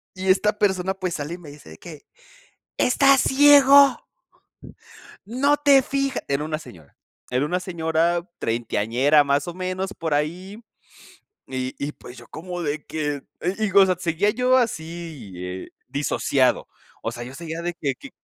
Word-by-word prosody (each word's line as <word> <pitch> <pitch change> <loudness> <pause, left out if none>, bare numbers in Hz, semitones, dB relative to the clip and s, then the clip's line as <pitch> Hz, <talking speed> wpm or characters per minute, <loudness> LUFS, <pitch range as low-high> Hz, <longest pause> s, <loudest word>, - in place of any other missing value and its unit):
Y 190 0 -4
esta 210 +3 +2
persona, 190 -2 +1
pues, 185 -3 -4
sale, 150 +3 -4
y - - -9
me 165 -5 -12
dice 145 - -14
de 80 - -13
qué: 155 -4 -11 0.8
"Estás 275 +1 +4
ciego" 280 -1 +6 1.3
"no 280 +6 +2
te 285 -2 +5
fijas", 275 +1 -2
era 140 +2 -1
una 155 0 -3
señora 80 - -15 0.4
era 125 +3 +1
una 180 +4 -1
señora 170 -1 0
treintañera, 120 +5 +2
más 140 +1 0
o 175 - -4
menos, 185 +2 -4
por 160 -2 -3
ahí. 180 +8 -3 0.9
Y 130 0 -4
y, 145 +1 -3
pues, 125 - -13
yo 120 - -13
como 175 +2 -7
de 150 -1 -3
que 145 -3 -3 0.2
y 175 - 0
digo, 200 -2 +4
o - - +7
sea, 185 -1 +1
seguía 175 +3 0
yo 250 +2 +2
así, 165 - -4
eh, 90 +1 -6 0.2
disociado. 140 -2 0 0.3
O 115 - -4
sea, 120 0 -7
yo 125 +2 -9
seguía 165 +2 -6
de 175 0 -3
que 145 -5 -2
que 275 - -12
170 Hz, 165 wpm, -23 LUFS, 145-195 Hz, 1.3 s, o